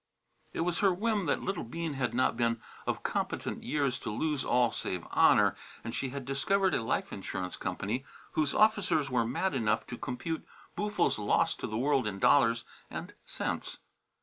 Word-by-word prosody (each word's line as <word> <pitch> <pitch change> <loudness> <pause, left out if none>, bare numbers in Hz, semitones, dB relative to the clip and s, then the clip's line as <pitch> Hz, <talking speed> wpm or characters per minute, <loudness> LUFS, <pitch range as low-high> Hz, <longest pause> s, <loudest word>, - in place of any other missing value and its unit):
It - - -3
was 170 -1 0
her 200 -2 +5
whim 205 0 0
that - - +1
little 195 -2 -2
Bean 160 +6 -4
had 130 -3 -1
not 130 - +3
been 115 -1 +1 0.3
of - - -1
competent - - -2
years 140 -4 0
to - - -5
lose 145 +6 -1
all 125 -2 +3
save 90 -5 -3
honour, - - +5 0.3
and 115 - -5
she 135 - -1
had 140 0 -6
discovered 190 +9 +2
a - - +2
life 115 - -1
insurance 95 -2 -4
company 100 +8 -2 0.3
whose 150 -2 +1
officers 205 -10 +3
were 115 -2 +2
mad 155 +9 0
enough 110 -4 +1
to 120 - -7
compute 160 +6 -3 0.3
Boo'ful's 210 - +1
loss 105 - +2
to - - -5
the 110 - -3
world 135 -1 +2
in 100 -2 -3
dollars 115 +2 +4 0.3
and - - -6
cents. - - -3
135 Hz, 175 wpm, -31 LUFS, 115-170 Hz, 0.3 s, her